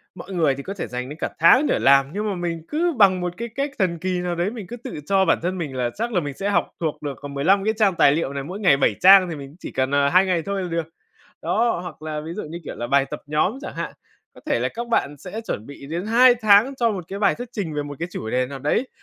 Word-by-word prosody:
mọi 190 - -9
người 155 -6 +2
thì 140 - -7
có 195 - -5
thể 200 - -5
dành 125 +1 -5
đến 150 - -8
cả - - -1
tháng 255 - +6
để - - +1
làm, 135 0 +5
nhưng 210 +2 -2
mà 200 - -2
mình 170 -2 -3
cứ 335 +2 0
bằng 190 -4 +5
một 175 0 -2
cái 235 - -4
cách 280 +1 -1
thần 170 -4 0
kỳ 185 0 -1
nào 175 -1 -2
đấy, 175 +4 0
mình 220 -6 -8
cứ 240 - -7
tự 240 - -7
cho 195 +1 +3
bản 165 - +3
thân 180 +3 -2
mình 150 -7 -4
là 125 -2 0
chắc 235 +3 -3
là 180 - +3
mình 145 -4 -4
sẽ 195 +8 -3
học 200 - +1
thuộc 160 -3 -3
được, 145 -3 -5
còn 145 -1 -7
15 190 +8 +2
cái 220 +2 +1
trang 200 -5 +3
tài 140 -4 +5
liệu 145 -2 -1
này, 140 -1 -4
mỗi 185 +7 -7
ngày 160 -9 +4
7 115 -6 +2
trang 190 0 +8
thì 165 - -4
mình 140 -2 -8
cũng 150 - -17
chỉ - - -7
cần, 130 +1 -1
ờ, 140 0 +3
2 185 +4 +5
ngày 180 -3 +1
thôi 195 +2 -3
là 180 - -4
được. 165 -1 -2 0.6
Đó, 230 -6 +1
hoặc 170 -3 -9
là 155 -1 -4
ví 160 +2 -7
dụ 210 - -4
như 165 +3 -7
kiểu - - -6
là 120 - -4
bài 140 +1 +2
tập - - -6
nhóm 155 - 0
chẳng - - -7
hạn, - - -4 0.4
có - - -15
thể - - +1
là - - 0
các 235 +1 -5
bạn 150 -10 0
sẽ 195 +9 -7
chuẩn 110 - -5
bị 140 -1 -11
đến 170 +6 -4
2 245 +2 +6
tháng 220 +3 +4
cho 235 -3 +2
một 185 -4 -4
cái 195 - -5
bài 205 - +3
thuyết 245 +1 -7
trình 175 -8 -4
về 145 - -1
một 145 -1 -8
cái 170 - -3
chủ 110 -9 -5
đề 125 0 +1
nào 135 0 -7
đấy, 150 - 0
175 Hz, 305 wpm, -22 LUFS, 145-205 Hz, 0.6 s, trang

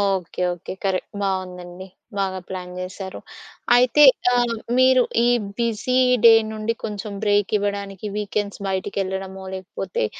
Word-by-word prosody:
Okay, 180 -1 -6
okay. 175 - -8
Correct 190 -1 -2
బావుందండి. 185 -1 -4 0.3
బాగా 190 -1 -1
plan 180 -1 -6
జేశారు. 185 +1 -6 0.6
అయితే 250 +4 +5 0.3
ఆహ్, 240 -1 +2 0.2
మీరు 255 -1 +5 0.2
ఈ - - +4 0.3
బిజీ 235 +2 0 0.3
డే 230 - +10 0.2
నుండి, 220 +1 -2
కొంచెం 210 -1 -5
బ్రేకివ్వడానికి 205 -1 0
వీకెండ్స్ 205 -1 -3
బయటికెళ్ళడమో, 190 0 -3
లేకపోతే 190 - -3
195 Hz, 110 wpm, -22 LUFS, 190-215 Hz, 0.6 s, డే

